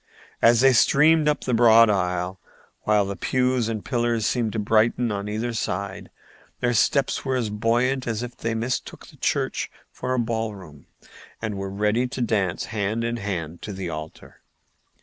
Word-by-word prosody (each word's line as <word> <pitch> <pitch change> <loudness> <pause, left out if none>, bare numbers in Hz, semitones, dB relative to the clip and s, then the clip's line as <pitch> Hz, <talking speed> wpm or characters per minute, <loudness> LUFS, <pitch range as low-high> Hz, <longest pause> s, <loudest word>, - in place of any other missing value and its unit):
As 115 0 +5
they 135 0 +6
streamed 150 +6 +4
up 150 - +1
the 125 - -1
broad 115 -1 +7
aisle, 90 -2 -1 0.5
while 105 -2 +3
the 100 0 -4
pews 125 +1 0
and 110 -2 -4
pillars 120 -3 0
seemed 115 -2 0
to - - -3
brighten 110 +2 +2
on 100 0 -3
either 115 +3 -2
side, 100 -3 -4 0.5
their 120 0 +1
steps 135 +4 +1
were 130 -1 -1
as 115 -5 -1
buoyant 120 +5 0
as 115 0 -2
if 120 -1 -7
they 115 0 -3
mistook 120 +3 -3
the - - -17
church - - -1 0.2
for 130 0 -3
a - - -2
ball 115 -2 -2
room 75 -7 -14 0.5
and 110 -2 -3
were 95 0 -4
ready 105 +5 0
to 125 - -7
dance 100 -6 0
hand 110 +2 -1
in 115 0 -2
hand 85 -6 -4
to 105 - -6
the 95 -2 -5
altar. 80 0 -9
115 Hz, 175 wpm, -24 LUFS, 100-120 Hz, 0.5 s, broad